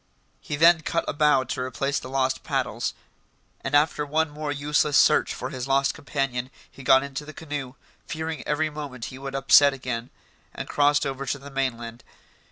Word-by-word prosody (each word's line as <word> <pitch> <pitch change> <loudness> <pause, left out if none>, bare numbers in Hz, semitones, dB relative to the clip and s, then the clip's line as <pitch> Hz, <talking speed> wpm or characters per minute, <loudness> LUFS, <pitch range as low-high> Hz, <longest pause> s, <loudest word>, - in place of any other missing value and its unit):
He 150 - -4
then 165 +2 +6
cut 155 +3 -1
a - - -1
bough 150 -3 +3
to 125 - -4
replace 140 +2 -1
the 130 - -9
lost 130 0 0
paddles, 125 -5 -2 0.7
and 135 +2 0
after 150 0 +3
one 155 +1 0
more 150 0 -4
useless 145 0 +1
search - - +4
for - - -5
his 130 0 -5
lost 135 0 +2
companion, 135 -4 -3 0.2
he - - -13
got 130 +1 +5
into 140 +1 -5
the 155 +1 -10
canoe, 145 -4 -6 0.3
fearing 160 -1 -4
every 155 +1 0
moment 140 -5 -6
he 130 - -9
would 135 0 -6
upset 140 +1 +6
again, 125 -2 -4 0.5
and - - -5
crossed 145 0 +3
over 135 0 -4
to 140 - -1
the 140 +1 -11
mainland. 120 -3 -3
140 Hz, 180 wpm, -25 LUFS, 130-150 Hz, 0.7 s, then